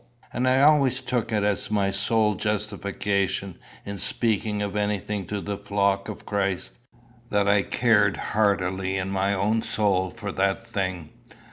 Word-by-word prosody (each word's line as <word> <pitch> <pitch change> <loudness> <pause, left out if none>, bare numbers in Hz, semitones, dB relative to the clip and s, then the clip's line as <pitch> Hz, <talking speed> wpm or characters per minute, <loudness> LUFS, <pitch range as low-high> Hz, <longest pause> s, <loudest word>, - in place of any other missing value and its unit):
And 125 +1 0
I 130 +1 +4
always 140 -4 +4
took 125 -3 -2
it 105 -2 +1
as 105 -1 -1
my 100 -2 +1
sole 105 +2 +2
justification, 100 -2 -2 0.3
in 100 -1 -5
speaking 110 -2 0
of 100 0 -4
anything 105 -1 -2
to 105 - -3
the 100 0 -4
flock 100 -1 0
of - - -8
Christ, 100 -3 -2 0.6
that 100 -1 +1
I 100 0 +4
cared 105 -3 +2 0.2
heartily 95 -2 +1
in 95 +1 -2
my 100 +1 +1
own 105 +4 +1
soul 95 -4 +1
for 105 -1 -6
that 95 +3 0
thing. 95 -7 -3
100 Hz, 150 wpm, -25 LUFS, 95-110 Hz, 0.6 s, I